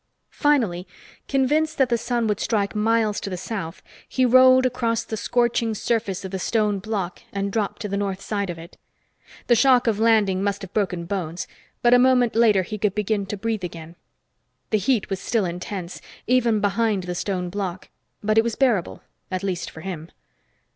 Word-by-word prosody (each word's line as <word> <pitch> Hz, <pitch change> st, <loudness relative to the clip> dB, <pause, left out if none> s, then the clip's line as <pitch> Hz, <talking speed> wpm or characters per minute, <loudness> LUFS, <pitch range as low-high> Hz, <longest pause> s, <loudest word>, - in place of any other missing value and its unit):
Finally, 225 Hz, -, +1 dB, 0.4 s
convinced 300 Hz, +4 st, +1 dB
that 265 Hz, -2 st, +3 dB
the 240 Hz, -, +3 dB
sun 240 Hz, 0 st, -1 dB
would 210 Hz, -1 st, 0 dB
strike 205 Hz, -3 st, 0 dB
miles 220 Hz, 0 st, +1 dB
to -, -, -5 dB
the 185 Hz, -, -4 dB
south, 190 Hz, -3 st, -5 dB, 0.3 s
he 260 Hz, -, +2 dB
rolled 255 Hz, +1 st, +6 dB
across 230 Hz, -2 st, 0 dB
the 220 Hz, -, -5 dB
scorching 235 Hz, 0 st, 0 dB
surface 210 Hz, -4 st, -1 dB
of 190 Hz, -, -6 dB
the 190 Hz, -, -3 dB
stone 210 Hz, 0 st, +1 dB
block 195 Hz, -3 st, -4 dB
and 200 Hz, 0 st, -2 dB
dropped 210 Hz, -1 st, -2 dB
to -, -, -2 dB
the 200 Hz, -, -3 dB
north 195 Hz, -1 st, -2 dB
side 200 Hz, -1 st, -3 dB
of 175 Hz, -, -5 dB
it. 165 Hz, +3 st, -12 dB, 0.7 s
The 240 Hz, -, +4 dB
shock 255 Hz, 0 st, +5 dB
of 220 Hz, -3 st, +1 dB
landing 215 Hz, -4 st, +3 dB
must 200 Hz, 0 st, -1 dB
have 195 Hz, -, -9 dB
broken 180 Hz, -5 st, -1 dB
bones, 170 Hz, -2 st, -3 dB, 0.4 s
but 240 Hz, 0 st, +5 dB
a 245 Hz, -, +7 dB
moment 250 Hz, -2 st, +3 dB
later 215 Hz, -5 st, +4 dB
he 215 Hz, +4 st, -6 dB
could 200 Hz, -1 st, 0 dB
begin 210 Hz, -1 st, -1 dB
to 210 Hz, -, -4 dB
breathe 220 Hz, -1 st, -2 dB
again. 165 Hz, -1 st, -7 dB, 0.8 s
The 215 Hz, -, +3 dB
heat 215 Hz, 0 st, 0 dB
was 195 Hz, -, -1 dB
still 220 Hz, -1 st, 0 dB
intense, 180 Hz, +1 st, -5 dB, 0.2 s
even 235 Hz, -4 st, +2 dB
behind 205 Hz, -1 st, +1 dB
the 180 Hz, 0 st, -4 dB
stone 180 Hz, 0 st, -3 dB
block, 185 Hz, -2 st, -4 dB, 0.3 s
but 215 Hz, +1 st, +3 dB
it -, -, +4 dB
was 235 Hz, -1 st, -2 dB
bearable 235 Hz, -10 st, 0 dB, 0.3 s
at 185 Hz, 0 st, -3 dB
least 185 Hz, -3 st, -2 dB
for 160 Hz, -, -11 dB
him. 170 Hz, -3 st, -6 dB
210 Hz, 190 wpm, -23 LUFS, 190-230 Hz, 0.8 s, a